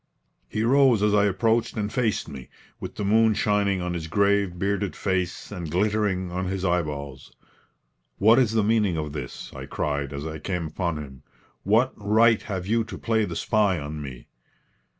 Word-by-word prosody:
He 110 Hz, -, -1 dB
rose 130 Hz, -3 st, +4 dB
as 105 Hz, -1 st, +3 dB
I 105 Hz, 0 st, +4 dB
approached 115 Hz, +4 st, +1 dB
and 105 Hz, -1 st, -2 dB
faced 120 Hz, -5 st, 0 dB
me, 70 Hz, -5 st, -9 dB, 0.3 s
with -, -, -7 dB
the 105 Hz, -, -3 dB
moon 110 Hz, +1 st, +4 dB
shining 100 Hz, -3 st, +1 dB
on 90 Hz, 0 st, -2 dB
his 80 Hz, -2 st, -4 dB
grave, 100 Hz, 0 st, +1 dB
bearded 100 Hz, -2 st, -1 dB
face 95 Hz, -1 st, -2 dB
and 90 Hz, -5 st, -5 dB
glittering 95 Hz, 0 st, 0 dB
on 90 Hz, +1 st, -2 dB
his 95 Hz, 0 st, -3 dB
eyeballs. 75 Hz, -6 st, -2 dB, 0.9 s
"What 110 Hz, +5 st, +5 dB
is 115 Hz, -4 st, +2 dB
the 110 Hz, -2 st, +2 dB
meaning 105 Hz, -5 st, +2 dB
of 75 Hz, -2 st, -4 dB
this?" 70 Hz, -5 st, -7 dB
I -, -, -8 dB
cried, 70 Hz, -1 st, -2 dB
as 70 Hz, +1 st, -5 dB
I 80 Hz, 0 st, -5 dB
came 90 Hz, +2 st, -3 dB
upon 85 Hz, 0 st, -2 dB
him. 65 Hz, -4 st, -9 dB, 0.4 s
"What 115 Hz, +6 st, +2 dB
right 110 Hz, +2 st, +3 dB
have 95 Hz, -4 st, -4 dB
you 115 Hz, +3 st, +1 dB
to 110 Hz, -, -8 dB
play 110 Hz, -2 st, +1 dB
the -, -, -6 dB
spy 105 Hz, -4 st, +1 dB
on 75 Hz, 0 st, -5 dB
me?" 65 Hz, -4 st, -8 dB
100 Hz, 180 wpm, -25 LUFS, 80-110 Hz, 0.9 s, What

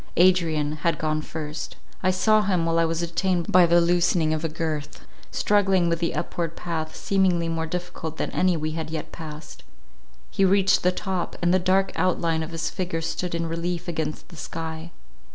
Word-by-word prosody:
Adrian 160 Hz, -5 st, +3 dB
had 165 Hz, -1 st, 0 dB
gone 155 Hz, 0 st, -1 dB
first. 155 Hz, 0 st, -6 dB, 0.3 s
I 185 Hz, -, +2 dB
saw 215 Hz, +4 st, +4 dB
him, 185 Hz, -5 st, +1 dB
while 165 Hz, 0 st, +2 dB
I 165 Hz, -, +4 dB
was 165 Hz, +1 st, -1 dB
detained 170 Hz, +1 st, 0 dB
by 180 Hz, -1 st, +7 dB
the 170 Hz, +1 st, +5 dB
loosening 170 Hz, -2 st, +2 dB
of 155 Hz, 0 st, -2 dB
a 165 Hz, -, 0 dB
girth, 155 Hz, -2 st, -4 dB, 0.3 s
struggling 195 Hz, -4 st, +2 dB
with 170 Hz, 0 st, 0 dB
the 170 Hz, -1 st, -1 dB
upward 165 Hz, -1 st, -3 dB
path, 160 Hz, -2 st, -4 dB
seemingly 185 Hz, -4 st, +1 dB
more 165 Hz, 0 st, -2 dB
difficult 175 Hz, -2 st, -5 dB
than -, -, -2 dB
any 180 Hz, -2 st, +2 dB
we 155 Hz, 0 st, -2 dB
had 160 Hz, 0 st, -4 dB
yet 160 Hz, -1 st, -5 dB
passed. 155 Hz, -2 st, -9 dB, 0.7 s
He 195 Hz, -, +1 dB
reached 195 Hz, 0 st, +4 dB
the 180 Hz, -, +3 dB
top, 185 Hz, -1 st, -3 dB
and 175 Hz, +1 st, +2 dB
the 185 Hz, -, +4 dB
dark 190 Hz, +2 st, +2 dB
outline 170 Hz, -3 st, +1 dB
of 160 Hz, -, -4 dB
his 165 Hz, -1 st, -3 dB
figure 175 Hz, -3 st, -3 dB
stood 170 Hz, +1 st, -3 dB
in 170 Hz, 0 st, -1 dB
relief 170 Hz, +2 st, -3 dB
against 160 Hz, -3 st, -3 dB
the 170 Hz, -, -13 dB
sky. 160 Hz, +1 st, -5 dB
170 Hz, 190 wpm, -25 LUFS, 160-180 Hz, 0.7 s, by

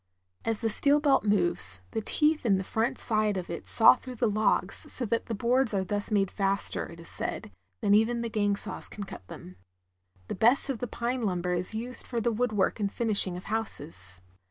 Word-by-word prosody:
As 225 Hz, -2 st, -2 dB
the 225 Hz, -, +1 dB
steel 285 Hz, +6 st, +3 dB
belt 285 Hz, -6 st, +3 dB
moves, 175 Hz, -, +2 dB
the 220 Hz, -, -2 dB
teeth 300 Hz, +7 st, +2 dB
in 205 Hz, -5 st, +3 dB
the 190 Hz, -, -2 dB
front 230 Hz, +7 st, -1 dB
side 215 Hz, -3 st, 0 dB
of 180 Hz, -2 st, -5 dB
it 170 Hz, -, -6 dB
saw 225 Hz, -, +7 dB
through 255 Hz, -1 st, -9 dB
the 235 Hz, -, 0 dB
logs, 215 Hz, +1 st, 0 dB
so 250 Hz, -, +1 dB
that 230 Hz, +1 st, -1 dB
boards 240 Hz, 0 st, +1 dB
are 190 Hz, -, +1 dB
thus 205 Hz, +2 st, -3 dB
made 200 Hz, -3 st, +1 dB
faster, 195 Hz, 0 st, 0 dB
it 170 Hz, -, -12 dB
is 170 Hz, -, -11 dB
said, -, -, -3 dB, 0.3 s
than 200 Hz, -, +3 dB
even 225 Hz, +3 st, +3 dB
the 235 Hz, -, -2 dB
gang 205 Hz, -2 st, +1 dB
saws -, -, -1 dB
can 205 Hz, -, -7 dB
cut 95 Hz, -, -10 dB
them. 90 Hz, 0 st, -11 dB, 0.7 s
The -, -, -3 dB
best 245 Hz, +7 st, +3 dB
of 245 Hz, -, -5 dB
the 245 Hz, -, -3 dB
pine 240 Hz, +3 st, -3 dB
lumber 180 Hz, -4 st, -1 dB
is 180 Hz, +4 st, -3 dB
used 245 Hz, +3 st, -3 dB
for 240 Hz, -, -2 dB
the 235 Hz, +1 st, +1 dB
woodwork 220 Hz, -3 st, 0 dB
and 200 Hz, -2 st, -1 dB
finishing 205 Hz, -6 st, +1 dB
of 180 Hz, -, -9 dB
houses. 145 Hz, -, -4 dB
215 Hz, 205 wpm, -28 LUFS, 190-235 Hz, 0.7 s, saw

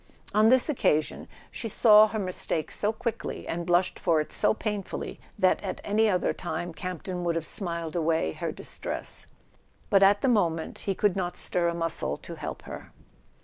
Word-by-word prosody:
On 215 Hz, +1 st, +5 dB
this 255 Hz, 0 st, +5 dB
occasion 155 Hz, -, 0 dB, 0.2 s
she 225 Hz, -, -4 dB
saw 215 Hz, 0 st, +7 dB
her 220 Hz, -, -4 dB
mistake 185 Hz, -5 st, -2 dB
so 210 Hz, -, 0 dB
quickly, 230 Hz, 0 st, -4 dB
and 170 Hz, +1 st, -3 dB
blushed 175 Hz, +1 st, +2 dB
for 165 Hz, -3 st, +2 dB
it 150 Hz, -, -4 dB
so -, -, +3 dB
painfully, 210 Hz, -2 st, -4 dB, 0.2 s
that -, -, +3 dB
at -, -, -4 dB
any 215 Hz, +2 st, +2 dB
other 180 Hz, -3 st, +1 dB
time 175 Hz, 0 st, -4 dB
Campton 180 Hz, +1 st, -5 dB
would 170 Hz, -1 st, 0 dB
have 165 Hz, -1 st, -2 dB
smiled 170 Hz, -4 st, -2 dB
away 160 Hz, -, +1 dB
her -, -, -4 dB
distress; -, -, -6 dB, 0.6 s
but 195 Hz, -, +5 dB
at 200 Hz, +1 st, +5 dB
the -, -, +2 dB
moment 170 Hz, -9 st, +1 dB
he 195 Hz, -, +1 dB
could 205 Hz, -1 st, +2 dB
not 180 Hz, -2 st, -2 dB
stir 175 Hz, -1 st, +1 dB
a 170 Hz, -, -1 dB
muscle 165 Hz, -1 st, -1 dB
to 170 Hz, -, -9 dB
help 155 Hz, -2 st, -6 dB
her. -, -, -9 dB
180 Hz, 180 wpm, -27 LUFS, 165-210 Hz, 0.6 s, saw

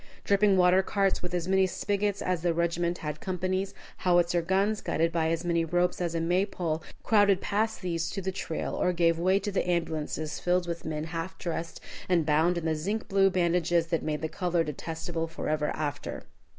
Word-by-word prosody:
Dripping 200 Hz, -1 st, +4 dB
water 180 Hz, +1 st, +5 dB
carts 195 Hz, 0 st, 0 dB
with 180 Hz, -, -4 dB
as 175 Hz, 0 st, -2 dB
many 190 Hz, 0 st, +3 dB
spigots 200 Hz, +1 st, -1 dB
as 180 Hz, -3 st, 0 dB
the 170 Hz, -1 st, +1 dB
regiment 170 Hz, +1 st, 0 dB
had 150 Hz, -1 st, -5 dB
companies, 185 Hz, +1 st, -2 dB, 0.2 s
howitzer 175 Hz, -1 st, +3 dB
guns 195 Hz, +5 st, +1 dB
guided 165 Hz, +1 st, 0 dB
by 160 Hz, -1 st, +1 dB
as 165 Hz, +1 st, -1 dB
many 170 Hz, -1 st, +2 dB
ropes 175 Hz, +2 st, 0 dB
as 170 Hz, -1 st, -1 dB
a -, -, +1 dB
May 175 Hz, +3 st, +2 dB
pole, 170 Hz, -5 st, -2 dB, 0.2 s
crowded 205 Hz, -3 st, +4 dB
past 220 Hz, +1 st, -1 dB
these 170 Hz, -2 st, -1 dB
to -, -, -4 dB
the 190 Hz, 0 st, -2 dB
trail, 165 Hz, -3 st, -4 dB
or 180 Hz, -, +1 dB
gave 165 Hz, -1 st, +2 dB
way 185 Hz, +3 st, +3 dB
to 205 Hz, +1 st, -2 dB
the 190 Hz, -2 st, -1 dB
ambulances 155 Hz, -3 st, -2 dB
filled 180 Hz, 0 st, +1 dB
with 170 Hz, -1 st, -4 dB
men 155 Hz, -1 st, -3 dB
half 165 Hz, +2 st, -5 dB
dressed 165 Hz, -1 st, -4 dB, 0.3 s
and 170 Hz, -4 st, +3 dB
bound 160 Hz, +4 st, +3 dB
in 170 Hz, -, -3 dB
the 160 Hz, -, +2 dB
zinc 200 Hz, +9 st, -3 dB
blue 195 Hz, 0 st, +4 dB
bandages 175 Hz, -2 st, +2 dB
that 165 Hz, -, +1 dB
made 150 Hz, -2 st, -2 dB
the -, -, +1 dB
color 175 Hz, +1 st, 0 dB
detestable 165 Hz, +2 st, -4 dB
forever 155 Hz, -2 st, -2 dB
after. 145 Hz, -2 st, -4 dB
175 Hz, 195 wpm, -28 LUFS, 165-185 Hz, 0.3 s, water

